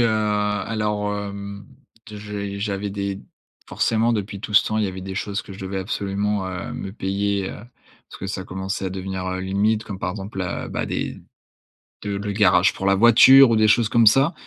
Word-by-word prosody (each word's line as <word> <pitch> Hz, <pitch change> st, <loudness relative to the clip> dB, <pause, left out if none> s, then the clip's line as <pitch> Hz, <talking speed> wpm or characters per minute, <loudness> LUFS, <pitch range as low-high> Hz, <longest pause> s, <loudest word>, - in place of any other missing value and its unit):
heu, 120 Hz, -, +4 dB
alors, 105 Hz, 0 st, -1 dB
hem, 100 Hz, 0 st, -6 dB, 0.5 s
j'ai 105 Hz, -1 st, -6 dB
j'avais 100 Hz, 0 st, -3 dB
des 100 Hz, 0 st, -4 dB, 0.5 s
forcément, 115 Hz, +1 st, +1 dB
depuis 100 Hz, -2 st, -3 dB
tout 105 Hz, -, -7 dB
ce 100 Hz, -, +5 dB
temps, 110 Hz, 0 st, -1 dB
il 110 Hz, -, +1 dB
y -, -, -1 dB
avait 95 Hz, 0 st, -7 dB
des 95 Hz, +1 st, -6 dB
choses 100 Hz, 0 st, -3 dB
que -, -, -11 dB
je 95 Hz, -, -11 dB
devais 95 Hz, 0 st, -4 dB
absolument, 100 Hz, +1 st, -2 dB
heu, 90 Hz, -2 st, -5 dB
me 95 Hz, -, -6 dB
payer, 100 Hz, -1 st, -1 dB
heu, -, -, -8 dB, 0.6 s
parce -, -, -11 dB
que 95 Hz, -, -5 dB
ça 95 Hz, -1 st, -4 dB
commençait 95 Hz, +1 st, -4 dB
à -, -, -3 dB
devenir, 95 Hz, 0 st, -5 dB
heu, 95 Hz, -, -3 dB
limite, 100 Hz, +4 st, 0 dB
comme 100 Hz, -3 st, -7 dB
par 90 Hz, -, -1 dB
exemple, 95 Hz, +1 st, -7 dB
là, 90 Hz, -2 st, -3 dB
bah -, -, -3 dB
des -, -, -4 dB, 0.8 s
de 100 Hz, -1 st, -3 dB
le 100 Hz, +1 st, -3 dB
garage 95 Hz, -3 st, +4 dB
pour 95 Hz, -, -4 dB
la 95 Hz, -, +4 dB
voiture 120 Hz, +5 st, +8 dB
ou 115 Hz, -, +3 dB
des 110 Hz, 0 st, +4 dB
choses 110 Hz, +1 st, +3 dB
comme 115 Hz, -1 st, +4 dB
ça. 135 Hz, +9 st, +5 dB
100 Hz, 205 wpm, -22 LUFS, 95-105 Hz, 0.8 s, voiture